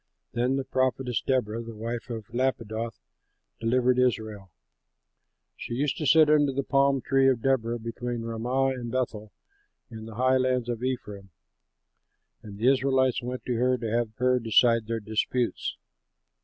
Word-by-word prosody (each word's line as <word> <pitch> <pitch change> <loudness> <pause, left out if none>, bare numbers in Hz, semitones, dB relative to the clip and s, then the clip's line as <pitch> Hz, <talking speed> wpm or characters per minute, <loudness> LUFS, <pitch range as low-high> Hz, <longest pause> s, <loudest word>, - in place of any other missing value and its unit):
Then 125 +3 +1
the 135 - -1
prophetess 130 -2 0
Deborah, 115 -4 -1
the 115 -1 -9
wife 115 +3 -5
of 115 -1 -7
Lappidoth, 115 -3 -2 0.6
delivered 125 +2 +2
Israel. 110 -6 -1 1.1
She 120 - -6
used 140 +2 0
to 150 - -1
sit 160 +1 +6
under 150 -2 +4
the 140 +1 -2
palm 135 0 +2
tree 135 +1 +3
of 120 -4 0
Deborah 120 -3 +1
between 120 +1 -5
Ramah 120 +4 0
and 125 -3 -4
Bethel 110 -5 -3 0.6
in 110 -1 -8
the 110 -1 -10
highlands 130 0 +1
of 120 -1 -3
Ephraim; 105 -7 -4 1.1
and 100 -2 -10
the 115 +4 +1
Israelites 130 -1 +2
went 125 +1 -5
to 125 - -1
her 125 +1 +2
to 115 -2 -4
have 115 -2 -1
her 125 +1 +2
decide 115 0 +3
their 115 0 -2
disputes. 110 +3 -2
120 Hz, 150 wpm, -27 LUFS, 115-130 Hz, 1.1 s, sit